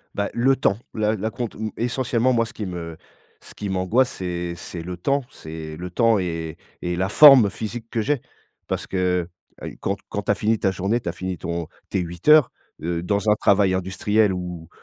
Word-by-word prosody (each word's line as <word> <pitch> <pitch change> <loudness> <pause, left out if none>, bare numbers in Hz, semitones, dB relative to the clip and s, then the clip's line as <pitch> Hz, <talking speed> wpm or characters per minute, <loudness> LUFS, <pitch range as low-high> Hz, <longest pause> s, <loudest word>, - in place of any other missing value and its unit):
Bah, 100 0 -1
le 130 +3 +3
temps. 100 - +2 0.2
L'a 110 0 +1
l'acompte, 110 +3 -4
mmh 110 +1 -3
essentiellement, 120 +1 +1
moi, 115 -1 +2
ce 115 - -10
qui 105 - -5
me 85 -3 -6 0.5
ce - - -12
qui 105 - -4
m'angoisse, 95 +7 +2
c'est 90 -1 -4
c'est 85 0 -7
le 90 +1 -6
temps 140 +9 0
c'est 80 -1 -8
le 90 +2 -6
temps 115 +4 +3
et 80 -3 -4 0.2
et 90 0 -2
la 95 +2 0
forme 130 -3 +9
physique 115 +3 -6
que 115 - -1
j'ai 140 +3 0 0.5
parce - - -2
que, 90 -2 0 0.4
heu, - - -5
quand - - -1
quand - - -3
tu - - +1
as - - +2
fini 110 +1 +1
ta 95 - +2
journée, 95 +5 0
tu - - -10
as - - -4
fini 90 0 -4
ton 85 -1 -4 0.2
tes 95 - 0
8 85 - -6
heures, 150 -3 +7 0.3
heu, 85 0 -1
dans 100 +4 0
un - - +5
travail 100 -2 +3
industriel 95 +3 +1
où 90 -3 -6
95 Hz, 205 wpm, -23 LUFS, 90-115 Hz, 0.5 s, forme